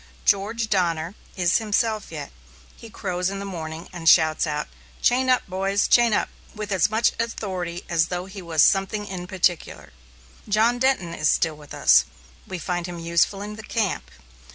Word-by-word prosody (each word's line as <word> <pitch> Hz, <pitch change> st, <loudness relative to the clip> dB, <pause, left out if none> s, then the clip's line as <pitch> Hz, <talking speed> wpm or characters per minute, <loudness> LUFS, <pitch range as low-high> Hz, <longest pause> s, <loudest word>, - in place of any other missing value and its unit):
George 215 Hz, +3 st, +1 dB
Donner 170 Hz, -4 st, 0 dB, 0.2 s
is 180 Hz, 0 st, +2 dB
himself 220 Hz, 0 st, -1 dB
yet. -, -, -7 dB, 0.4 s
He 230 Hz, -, -12 dB
crows 180 Hz, -3 st, -2 dB
in 195 Hz, -, -5 dB
the 200 Hz, -, -5 dB
morning 165 Hz, -3 st, -6 dB
and 165 Hz, -2 st, +2 dB
shouts 160 Hz, -1 st, +4 dB
out, 150 Hz, 0 st, -2 dB, 0.3 s
"Chain 255 Hz, +1 st, +2 dB
up, 255 Hz, -, +3 dB
boys! 195 Hz, +2 st, 0 dB
chain 240 Hz, -1 st, +5 dB
up!" -, -, +1 dB, 0.3 s
with 210 Hz, -1 st, -5 dB
as 190 Hz, 0 st, +3 dB
much 220 Hz, +2 st, +2 dB
authority 185 Hz, -6 st, -3 dB
as 165 Hz, -1 st, +2 dB
though 180 Hz, +1 st, -4 dB
he 195 Hz, 0 st, -9 dB
was 165 Hz, -3 st, +2 dB
"something 205 Hz, +2 st, +2 dB
in 180 Hz, -3 st, -6 dB
particular." 180 Hz, -, -1 dB, 0.6 s
John 225 Hz, +4 st, +3 dB
Denton 255 Hz, -10 st, +1 dB
is 150 Hz, -2 st, +1 dB
still 160 Hz, -2 st, +1 dB
with 150 Hz, -1 st, -11 dB
us. -, -, +5 dB, 0.4 s
We 185 Hz, -, -5 dB
find 175 Hz, 0 st, -3 dB
him 175 Hz, -1 st, -7 dB
useful 170 Hz, +4 st, +1 dB
in 210 Hz, +1 st, -7 dB
the -, -, -7 dB
camp. 205 Hz, -, -2 dB
190 Hz, 175 wpm, -24 LUFS, 170-210 Hz, 0.6 s, chain